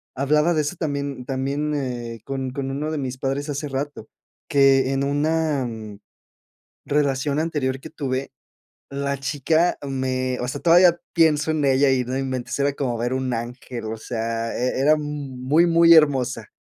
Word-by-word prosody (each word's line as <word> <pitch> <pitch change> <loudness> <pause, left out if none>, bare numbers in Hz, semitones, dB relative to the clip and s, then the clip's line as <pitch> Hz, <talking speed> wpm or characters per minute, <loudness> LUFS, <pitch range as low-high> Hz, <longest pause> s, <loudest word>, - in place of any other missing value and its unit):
hablaba 150 +5 +2
de 155 - +2
eso 150 +4 -3
también 140 -4 -3
también, 140 +3 -2
eh, 120 -5 -4
con 135 -1 -3
con 135 0 -4
uno 150 +3 -3
de 155 - -2
mis 130 -1 -4
padres 140 +2 -2
hace 145 +1 -3
rato. 135 -4 -4 0.4
Que 135 -1 +4
en 135 0 0
una, 150 0 0
mm, 110 -3 -8 0.9
relación 140 0 0
anterior 145 -5 -1
que 160 - -9
tuve, 135 -4 -3 0.6
la 140 0 -2
chica 155 +5 +1
me, 130 -1 -1
o 125 - -3
sea, 140 +3 -4
todavía 175 0 +5 0.2
pienso 160 -2 +3
en 155 -2 -1
ella 135 0 +4
y 130 -1 +1
no 130 +2 -3
inventes, 130 -1 -3
era 140 0 +2
como 125 -5 -2
ver 120 +2 -1
un 130 -1 -2
ángel. 120 0 -6
O 110 +1 -4
sea, 115 0 -3
e 125 +1 -1
era 145 +3 +5
m 155 - -3 0.4
muy, 145 +7 +3
muy 170 0 +6
hermosa, 130 -8 +3
135 Hz, 170 wpm, -23 LUFS, 130-150 Hz, 0.9 s, muy